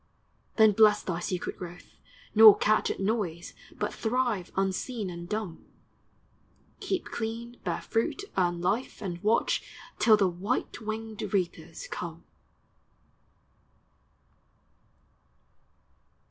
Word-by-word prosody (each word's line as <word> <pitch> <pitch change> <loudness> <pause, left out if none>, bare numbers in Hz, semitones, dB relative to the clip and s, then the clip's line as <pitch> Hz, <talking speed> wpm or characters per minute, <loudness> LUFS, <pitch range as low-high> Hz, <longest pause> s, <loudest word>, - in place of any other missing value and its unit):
Then 220 -1 +6
bless 210 0 +5
thy 175 -2 -2
secret 180 0 -3
growth, 175 -1 -10 0.4
nor 215 -2 +10
catch 215 0 +2
At - - -3
noise, 195 -5 -2 0.2
but - - -2
thrive 230 -5 -1
unseen 195 +2 -2
and 170 0 -8
dumb; 210 -6 -4 1.2
Keep 375 -2 -2
clean, 235 +1 -4
bear - - -2
fruit, 230 - -1
earn 175 -2 +1
life, 205 +8 -1
and 175 -3 -4
watch 215 +2 +2 0.4
Till 220 -2 +6
the 200 -2 +3
white 185 +7 -2
w 220 -2 -7
r - - -1
inged 220 -1 -7
reapers 195 - -2
come - - -6
210 Hz, 110 wpm, -28 LUFS, 180-225 Hz, 1.2 s, nor